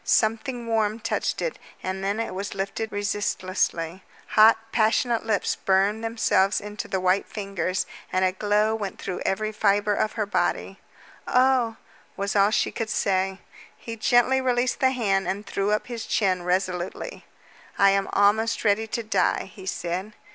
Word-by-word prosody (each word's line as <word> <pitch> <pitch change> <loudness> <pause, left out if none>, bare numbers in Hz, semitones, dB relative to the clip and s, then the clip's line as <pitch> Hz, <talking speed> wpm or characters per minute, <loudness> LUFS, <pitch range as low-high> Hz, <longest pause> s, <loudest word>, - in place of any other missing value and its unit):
Something 230 +3 +1
warm 220 -1 0
touched 225 - -2
it, - - -3 0.2
and 190 +1 -3
then 200 +3 -1
it 230 - -3
was 195 +1 -5
lifted 200 +3 -3
resistlessly. 190 -4 -1 0.3
Hot, 220 +1 +7
passionate 230 +1 +1
lips 210 -3 0
burned 200 +3 +1
themselves 220 -3 +2
into 210 0 -6
the 190 - -1
white 185 +2 +1
fingers, 195 -3 -2 0.3
and 185 0 +2
a 185 - +2
glow 210 +3 +1
went 210 -3 -4
into 185 - -4
every 215 +2 0
fiber 205 -1 +2
of 215 +1 0
her 215 -2 -1
body. 205 - -1 0.5
"Oh!" 250 -3 +3 0.4
was 200 +1 -2
all 200 0 +5
she 220 - +1
could 225 -1 -4
say. 190 -1 0 0.4
He 230 - -7
gently 245 +4 +3
released 250 0 +1
the 260 -2 +4
hand 195 -7 0
and 200 +3 -3
threw 200 0 -1
up 210 0 +1
his 235 -2 -6
chin 185 -4 +1
resolutely. 180 - -2 0.5
"I 200 -1 +6
am 195 0 0
almost 210 +3 +2
ready 215 +2 +2
to 230 +2 -3
die," 215 -2 0
he 190 -2 -11
said. 185 +4 -3
205 Hz, 160 wpm, -25 LUFS, 195-225 Hz, 0.5 s, Hot